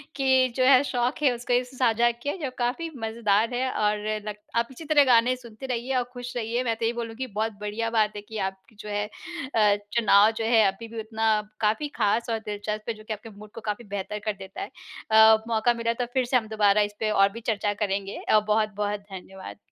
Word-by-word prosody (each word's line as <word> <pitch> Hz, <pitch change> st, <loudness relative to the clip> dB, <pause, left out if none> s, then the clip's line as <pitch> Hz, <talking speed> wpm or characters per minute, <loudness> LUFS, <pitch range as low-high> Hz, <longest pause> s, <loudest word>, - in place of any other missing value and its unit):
कि 260 Hz, -2 st, +3 dB
जो 255 Hz, -, +2 dB
है 265 Hz, +1 st, +6 dB
शौक़ 250 Hz, +2 st, -1 dB
है, 265 Hz, -, +5 dB
उसको 245 Hz, +1 st, -3 dB
ऐसे 250 Hz, +1 st, -1 dB
साझा 240 Hz, -1 st, +3 dB
किया 240 Hz, +7 st, -4 dB
जो 265 Hz, -, -1 dB
काफ़ी 255 Hz, +7 st, -1 dB
मज़ेदार 220 Hz, +1 st, +1 dB
है 260 Hz, +1 st, 0 dB
और 210 Hz, 0 st, +1 dB, 0.3 s
नग 210 Hz, -, -5 dB, 0.2 s
आप 235 Hz, 0 st, +2 dB
इसी 310 Hz, +5 st, -10 dB
तरह 290 Hz, -1 st, +5 dB
गाने 245 Hz, 0 st, +4 dB
सुनते 240 Hz, +1 st, -11 dB
रहिए 250 Hz, +1 st, -2 dB
और 250 Hz, -, +2 dB
खुश 245 Hz, 0 st, -7 dB
रहिए। 235 Hz, +2 st, -1 dB
मैं 230 Hz, -2 st, 0 dB
तो 225 Hz, 0 st, -3 dB
यही 230 Hz, -, +1 dB
बोलूँगी, 235 Hz, +2 st, -5 dB
बहुत 220 Hz, +1 st, -2 dB
बढ़िया 210 Hz, +2 st, -2 dB
बात 215 Hz, -2 st, +1 dB
है 205 Hz, -, -5 dB
कि 220 Hz, +1 st, -9 dB
आप 190 Hz, 0 st, -7 dB, 0.2 s
जो 210 Hz, 0 st, -10 dB
है 205 Hz, 0 st, -1 dB, 0.5 s
अ, 210 Hz, -2 st, +5 dB, 0.2 s
चुनाव 215 Hz, -2 st, +5 dB
जो 225 Hz, 0 st, -4 dB
है 225 Hz, -1 st, +5 dB
अभी 195 Hz, +4 st, -4 dB
भी 225 Hz, 0 st, -7 dB
उतना 220 Hz, -1 st, +1 dB, 0.2 s
काफ़ी 220 Hz, +8 st, +1 dB
ख़ास 225 Hz, +2 st, +1 dB
और 225 Hz, -1 st, 0 dB
दिलचस्प 210 Hz, +1 st, -5 dB
है -, -, 0 dB
जो 215 Hz, -, -14 dB
कि 220 Hz, -, -4 dB
आपके 215 Hz, +2 st, -9 dB
मूड 210 Hz, 0 st, -13 dB
को 230 Hz, -, -9 dB
काफ़ी 210 Hz, +2 st, -4 dB
बेहतर 205 Hz, +1 st, -4 dB
कर 215 Hz, -, 0 dB
देता 190 Hz, -1 st, -9 dB
है। -, -, -4 dB, 0.4 s
अ, 220 Hz, 0 st, +7 dB
मौक़ा 230 Hz, +1 st, +2 dB
मिला 230 Hz, 0 st, -1 dB
तो -, -, -1 dB
फिर 260 Hz, -2 st, +2 dB
से 250 Hz, +1 st, +3 dB
हम 220 Hz, -2 st, -3 dB
दोबारा 210 Hz, -1 st, +3 dB
इसपे 210 Hz, +1 st, -1 dB
और 195 Hz, -1 st, +4 dB
भी 230 Hz, +2 st, -9 dB
चर्चा 205 Hz, -1 st, -1 dB
करेंगे। 200 Hz, -1 st, -2 dB
अ, 215 Hz, -, +6 dB
बहुत-बहुत 210 Hz, -1 st, 0 dB
धन्यवाद। 190 Hz, -, -10 dB
220 Hz, 225 wpm, -26 LUFS, 210-240 Hz, 0.5 s, अ